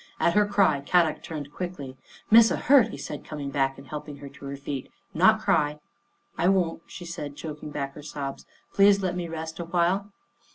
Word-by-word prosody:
At 170 Hz, -, +3 dB
her 210 Hz, +1 st, +4 dB
cry 195 Hz, -8 st, +3 dB
Kadok 165 Hz, +1 st, +2 dB
turned 150 Hz, -3 st, -7 dB
quickly, 160 Hz, -8 st, -6 dB, 0.2 s
" -, -, -23 dB
Missa 225 Hz, 0 st, +7 dB
hurt," 265 Hz, -5 st, +5 dB
he 225 Hz, -, -8 dB
said, -, -, -6 dB
coming 145 Hz, -2 st, -6 dB
back 135 Hz, -1 st, 0 dB
and 135 Hz, -, -12 dB
help 150 Hz, +2 st, -7 dB
ing 145 Hz, -, -8 dB
her 140 Hz, 0 st, -9 dB
to 140 Hz, -, -13 dB
her 140 Hz, 0 st, -5 dB
feet. 140 Hz, -1 st, -6 dB
" -, -, -41 dB
Not 220 Hz, +3 st, +7 dB
cry." 150 Hz, -7 st, +1 dB, 0.3 s
" -, -, -39 dB
I 170 Hz, -, +3 dB
won't," 180 Hz, -4 st, +1 dB
she 175 Hz, -, -9 dB
said, 150 Hz, -4 st, -6 dB
choking 150 Hz, 0 st, -7 dB
back 140 Hz, -2 st, -4 dB
her 150 Hz, -, -10 dB
sobs. 140 Hz, -2 st, -6 dB
" -, -, -37 dB
Please 200 Hz, 0 st, +5 dB
let 180 Hz, -1 st, -1 dB
me 175 Hz, -1 st, -3 dB
rest 160 Hz, 0 st, -6 dB
awhile." 175 Hz, +4 st, 0 dB
160 Hz, 215 wpm, -26 LUFS, 145-185 Hz, 0.3 s, Missa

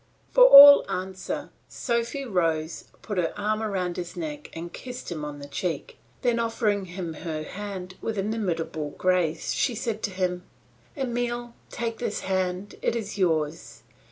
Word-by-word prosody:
For -, -, +7 dB
all 285 Hz, -, +11 dB
answer, 185 Hz, 0 st, -4 dB, 0.2 s
Sophy 235 Hz, +3 st, -2 dB
rose, 165 Hz, -7 st, -1 dB, 0.2 s
put 205 Hz, -4 st, -2 dB
her 165 Hz, -, -1 dB
arm 215 Hz, +1 st, -1 dB
round 185 Hz, -5 st, -2 dB
his 175 Hz, -1 st, -6 dB
neck, 300 Hz, -3 st, -5 dB
and 170 Hz, +1 st, -7 dB
kissed 250 Hz, -6 st, -8 dB
him 155 Hz, -3 st, -4 dB
on 150 Hz, -1 st, -5 dB
the 140 Hz, 0 st, -9 dB
cheek; 160 Hz, -, -4 dB, 0.2 s
then 240 Hz, -1 st, +2 dB
offering 225 Hz, -4 st, 0 dB
him 175 Hz, -2 st, -6 dB
her 155 Hz, -1 st, -5 dB
hand 185 Hz, 0 st, -7 dB
with 220 Hz, -2 st, -3 dB
inimitable 175 Hz, -8 st, -2 dB
grace 180 Hz, -3 st, +1 dB
she 250 Hz, -, 0 dB
said 220 Hz, 0 st, -3 dB
to -, -, -1 dB
him, 185 Hz, -1 st, -2 dB, 0.6 s
"Emile, 240 Hz, -2 st, -2 dB, 0.2 s
take 230 Hz, -1 st, -4 dB
this 215 Hz, -3 st, -3 dB
hand; 185 Hz, +1 st, -2 dB
it -, -, 0 dB
is 210 Hz, -3 st, -4 dB
yours. 160 Hz, -4 st, -1 dB
190 Hz, 155 wpm, -26 LUFS, 175-230 Hz, 0.6 s, all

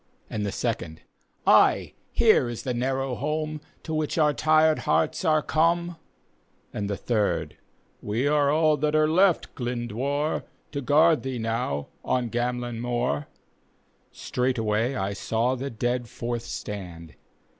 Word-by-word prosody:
And 105 Hz, -, -2 dB
the -, -, -2 dB
second, 80 Hz, -, -3 dB
'•' -, -, -23 dB, 0.4 s
Ay, -, -, +4 dB, 0.2 s
here 120 Hz, -, +4 dB
is 120 Hz, -, -6 dB
the 125 Hz, -, -2 dB
narrow 130 Hz, +2 st, -1 dB
home, 155 Hz, +3 st, -2 dB, 0.2 s
To 160 Hz, -, -5 dB
which 155 Hz, 0 st, -1 dB
our 150 Hz, -2 st, +4 dB
tired 155 Hz, +1 st, +3 dB
hearts 155 Hz, -, +1 dB
are 155 Hz, -1 st, +3 dB
cornel 170 Hz, +1 st, +1 dB, 0.4 s
" -, -, -39 dB
And 100 Hz, -1 st, -3 dB
the 100 Hz, -, -2 dB
third, 110 Hz, -4 st, -1 dB, 0.2 s
" -, -, -39 dB
We 115 Hz, +6 st, +1 dB
are 145 Hz, -1 st, +3 dB
all 155 Hz, 0 st, +3 dB
that 150 Hz, +2 st, 0 dB
are 155 Hz, 0 st, +4 dB
left, 180 Hz, +2 st, +3 dB
Glyndwr, 125 Hz, +4 st, -2 dB, 0.3 s
To 140 Hz, -, -3 dB
guard 155 Hz, +4 st, +4 dB
thee 130 Hz, -1 st, -4 dB
now 115 Hz, -, -2 dB
on 125 Hz, -3 st, 0 dB
Gamellyn 120 Hz, -1 st, -2 dB
moor." 125 Hz, +4 st, -1 dB, 0.8 s
Straightway 120 Hz, -1 st, -1 dB
I 100 Hz, -3 st, -2 dB
saw 115 Hz, +5 st, 0 dB
the 130 Hz, +2 st, -4 dB
dead 120 Hz, +1 st, -2 dB
forth 120 Hz, 0 st, -4 dB
stand. 90 Hz, -9 st, -7 dB
125 Hz, 145 wpm, -26 LUFS, 115-155 Hz, 0.8 s, Ay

